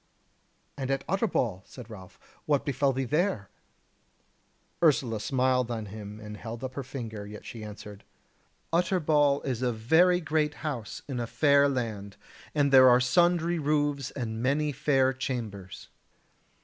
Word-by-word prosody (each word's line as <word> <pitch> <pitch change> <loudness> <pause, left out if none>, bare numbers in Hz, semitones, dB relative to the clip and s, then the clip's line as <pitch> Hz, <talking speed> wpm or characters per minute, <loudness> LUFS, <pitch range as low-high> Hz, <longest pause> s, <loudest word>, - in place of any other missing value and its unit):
"And 135 -1 -3
at 135 0 -1
Utterbol," 145 - 0
said 125 -4 -11
Ralph, 95 -5 -12 0.3
"what 145 -2 +1
befell 140 0 +1
thee 135 +1 -2
there?" 150 - -1 1.3
Ursula 130 -9 +2
smiled 130 0 +1
on 115 -2 -3
him, 105 +1 -9
and 105 -1 -8
held 115 +3 -7
up 130 0 -4
her 140 - -4
finger; 115 -6 -7
yet 105 0 -10
she 115 -2 -8
answered: 105 -1 -10 0.7
"Utterbol 155 -5 +2
is 130 -3 -2
a 125 -1 +1
very 160 +11 +3
great 155 -2 0
house 130 -8 -4
in 135 -4 -4
a 120 - -2
fair 140 +4 +4
land, 110 -6 -4 0.4
and 145 -2 +2
there 130 -1 +8
are 125 0 +6
sundry 170 +5 +2
roofs 145 -2 0
and 115 -4 -5
many 145 +4 +1
fair 135 -1 +2
chambers. 110 -8 -6
130 Hz, 145 wpm, -28 LUFS, 110-145 Hz, 1.3 s, there